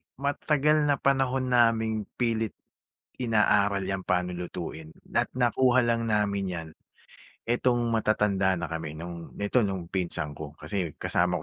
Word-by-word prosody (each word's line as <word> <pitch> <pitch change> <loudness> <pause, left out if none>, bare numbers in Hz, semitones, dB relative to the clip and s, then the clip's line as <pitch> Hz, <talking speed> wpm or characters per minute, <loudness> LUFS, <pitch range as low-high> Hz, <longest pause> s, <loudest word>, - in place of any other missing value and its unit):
matagal 150 +2 +1
na 145 - +4
panahon 135 -2 +1
naming 110 -3 +2
pilit 115 -3 -1 0.7
inaaral 105 -3 +3
'yan 95 -1 -2
paano 90 0 0
lutuin 85 -3 -6 0.2
at - - +2
nakuha 125 0 +3
lang 115 0 +1
namin 100 -2 +1
'yan 80 -2 -5 0.8
etong 120 +1 +2 0.2
matatanda 100 -4 +2
na 85 - -3
kami 80 -2 -5
no'ng, 85 0 -8
nito 105 +5 +1
nung 95 -5 -1
pinsan 85 -5 -2
ko, 75 0 -9
kasi 95 -7 -4
kasama 90 +1 +1
105 Hz, 130 wpm, -27 LUFS, 90-120 Hz, 0.8 s, na